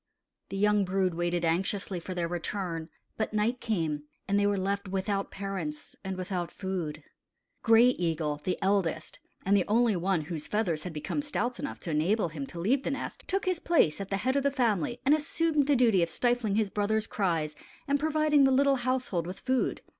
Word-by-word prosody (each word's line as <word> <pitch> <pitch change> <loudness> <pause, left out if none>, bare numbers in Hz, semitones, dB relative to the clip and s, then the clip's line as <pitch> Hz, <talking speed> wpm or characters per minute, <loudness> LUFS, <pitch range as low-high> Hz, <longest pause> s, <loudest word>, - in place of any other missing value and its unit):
The 195 - -4
young 210 0 +3
brood 185 -1 +1
waited 175 0 0
anxiously 185 +2 0
for 185 +2 -6
their 170 -1 0
return; 170 -1 -3 0.3
but 220 -1 -2
night 225 +4 +1
came, 160 -9 -1 0.2
and 200 +1 +2
they 205 - +3
were 205 -1 +1
left 200 +1 -1
without 195 +1 -1
parents 190 -7 -5
and 190 -1 -4
without 180 -2 -3
food. 170 -6 -4 0.6
Gray 230 +1 +6
Eagle, 160 -8 -1
the 185 - -1
eldest, 190 -5 0 0.3
and 200 +2 +4
the 190 - +2
only 230 0 +3
one 180 -1 +1
whose 155 -1 -5
feathers 180 -5 0
had 180 - -4
become 155 - -2
stout 250 -4 -2
enough 280 - -5
to 170 - -4
enable 175 +5 +1
him 145 -3 -6
to 170 - -8
leave 245 +10 +2
the - - -2
nest, 275 - -5
took 390 +1 0
his 365 -2 +1
place 250 - +2
at 195 - -6
the 195 - 0
head 260 +7 0
of 280 - +3
the 280 - +2
family 240 - 0
and 280 - +6
assumed 310 -1 +1
the 290 - +4
duty 230 -7 +4
of 170 - +1
stifling 240 -3 +1
his 215 -2 +1
brothers' 215 +1 0
cries 165 -8 -1 0.3
and 285 0 +2
providing 305 -1 +3
the 270 - +6
little 275 +1 +4
household 245 -9 -1
with 185 - -6
food. 260 -1 0
195 Hz, 200 wpm, -29 LUFS, 175-245 Hz, 0.6 s, Gray